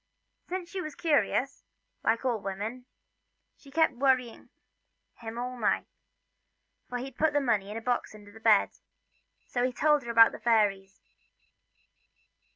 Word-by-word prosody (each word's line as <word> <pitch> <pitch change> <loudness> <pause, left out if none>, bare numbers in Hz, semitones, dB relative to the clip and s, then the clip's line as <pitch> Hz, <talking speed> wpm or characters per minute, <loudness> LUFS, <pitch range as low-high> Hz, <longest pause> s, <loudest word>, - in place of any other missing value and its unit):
Since 355 -1 -5
she 385 - -3
was 310 -4 -7
curious, 290 -4 0 0.4
like 230 +3 +1
all 240 -4 +1
women, 210 +6 -5 0.7
she 280 - -18
kept 320 +1 +2
worrying 250 -2 0 0.7
him 230 -1 -7
all 250 +1 -4
night - - +1 1.0
for 245 - -3
he'd 255 +1 -8
put 315 -1 +2
the 290 - +3
money 220 -7 0
in 210 - -5
a - - -5
box 245 -2 -2
under 205 -1 -14
the 225 - -14
bed 220 -2 +4 0.7
so 245 - -2
he 255 - +1
told 295 +3 +2
her 235 - -9
about 230 -1 +7
the - - -9
fairies. 200 -4 +1
245 Hz, 150 wpm, -29 LUFS, 225-275 Hz, 1.0 s, about